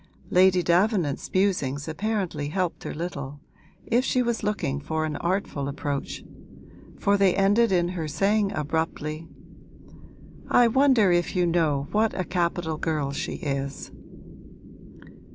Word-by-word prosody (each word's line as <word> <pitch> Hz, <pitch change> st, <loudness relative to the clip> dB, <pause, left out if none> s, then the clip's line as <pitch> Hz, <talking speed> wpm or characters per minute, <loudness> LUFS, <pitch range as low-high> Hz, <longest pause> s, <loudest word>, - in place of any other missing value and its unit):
Lady 185 Hz, 0 st, +5 dB
Davenant's 175 Hz, -4 st, +1 dB
musings 155 Hz, -8 st, 0 dB
apparently 185 Hz, -3 st, -2 dB
helped 180 Hz, +1 st, -2 dB
her -, -, -4 dB
little, 145 Hz, -4 st, -5 dB, 0.5 s
if 240 Hz, +2 st, +2 dB
she 255 Hz, -1 st, +1 dB
was 235 Hz, -1 st, -1 dB
looking 205 Hz, -10 st, -1 dB
for 155 Hz, +2 st, -2 dB
an 155 Hz, -1 st, -3 dB
artful 170 Hz, -6 st, -2 dB
approach; 140 Hz, 0 st, -4 dB, 0.7 s
for 200 Hz, 0 st, +2 dB
they 195 Hz, -2 st, +3 dB
ended 205 Hz, +4 st, +3 dB
in 175 Hz, -2 st, +2 dB
her 170 Hz, -4 st, -4 dB
saying 200 Hz, +6 st, +1 dB
abruptly, 155 Hz, +1 st, -3 dB, 1.2 s
'I 240 Hz, -1 st, +5 dB
wonder 255 Hz, -6 st, +4 dB
if 175 Hz, +2 st, +1 dB
you 180 Hz, -1 st, +3 dB
know 155 Hz, -5 st, +1 dB
what 215 Hz, -1 st, +1 dB
a -, -, +1 dB
capital 170 Hz, -2 st, -1 dB
girl 150 Hz, -4 st, -1 dB
she 160 Hz, +5 st, -4 dB
is.' 140 Hz, -4 st, -4 dB
175 Hz, 130 wpm, -25 LUFS, 150-200 Hz, 1.2 s, Lady